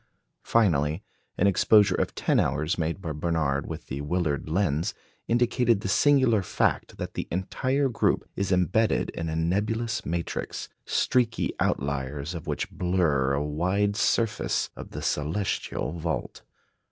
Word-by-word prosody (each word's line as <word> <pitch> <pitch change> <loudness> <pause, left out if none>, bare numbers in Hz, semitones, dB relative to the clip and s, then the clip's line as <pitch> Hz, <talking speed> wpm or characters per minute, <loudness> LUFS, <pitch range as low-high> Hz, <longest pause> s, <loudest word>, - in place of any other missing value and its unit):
Finally, 80 -5 +2 0.3
an 95 - +2
exposure 100 +1 +5
of - - -1
ten - - +2
hours 75 +6 0
made 85 0 -2
by 80 - -3
Barnard 75 -3 -1
with - - -6
the 70 +2 -5
Willard 75 -1 -1
lens 80 -3 0 0.3
indicated 120 -2 +2
the - - -3
singular 130 -1 +4
fact 90 - -1
that - - -5
the - - -4
entire 130 +10 0
group 120 - 0
is 100 0 -1
embedded 95 +5 +2
in 80 0 -4
a 80 - -2
nebulous 105 +7 0
matrix, 85 +1 -4 0.2
streaky 125 -3 +1
outliers 70 +3 -1
of 85 0 -7
which 75 - -2
blur 80 -7 +1
a 70 +1 0
wide 95 +7 0
surface 115 0 +1
of - - -9
the - - -7
celestial 80 +3 -1
vault. 80 -1 -4
90 Hz, 140 wpm, -27 LUFS, 75-105 Hz, 0.3 s, exposure